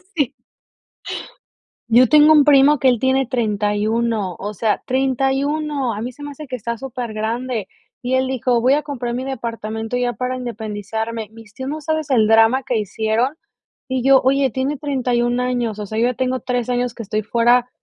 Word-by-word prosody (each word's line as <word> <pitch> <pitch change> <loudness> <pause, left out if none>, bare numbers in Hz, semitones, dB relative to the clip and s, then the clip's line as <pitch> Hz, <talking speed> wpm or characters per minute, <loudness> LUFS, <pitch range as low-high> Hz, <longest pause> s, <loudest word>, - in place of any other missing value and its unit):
Sí. 285 -4 0 1.6
Yo 240 +2 +6
tengo 305 +1 +7
un 295 -2 +6
primo 290 0 +5
que 260 - +4
él 245 -3 +2
tiene 260 +1 +1
31. 215 -3 0
O 205 +1 -4
sea, 215 +2 0
31, 270 +1 0
a 210 - -5
mí 245 +3 -4
se 290 +4 -12
me 290 - -6
hace 295 +1 -10
que 255 - -4
está 235 0 -4
súper 250 -3 -5
grande. 225 0 -3 0.3
Y 255 +1 0
él 260 0 +2
dijo: 250 -2 +1
"Voy 255 +3 +3
a 295 - +2
comprar 250 -5 -4
mi 250 +2 -3
departamento 230 -3 -4
ya 245 -1 0
para 255 +1 -3
independizarme". 220 -1 -4
Mis 225 -2 -15
tios, 260 +3 -6
¿no 310 +2 -4
sabes 315 0 -2
el 230 -5 +4
drama 225 +4 +4
que 245 - -1
hicieron? 220 +6 -1 0.5
Y 260 -1 -1
yo, 270 0 +6
oye, 270 +1 +3
tiene 265 +4 -2
31 250 -3 0
años. 245 -4 -1
O 210 - -5
sea, 220 +2 -4
yo 235 - +3
ya 250 - -2
tengo 255 +1 -1
3 250 -2 -2
años 245 -1 -1
que 230 - -6
estoy 215 +1 -2
fuera 240 +3 +2
245 Hz, 190 wpm, -20 LUFS, 225-265 Hz, 1.6 s, tengo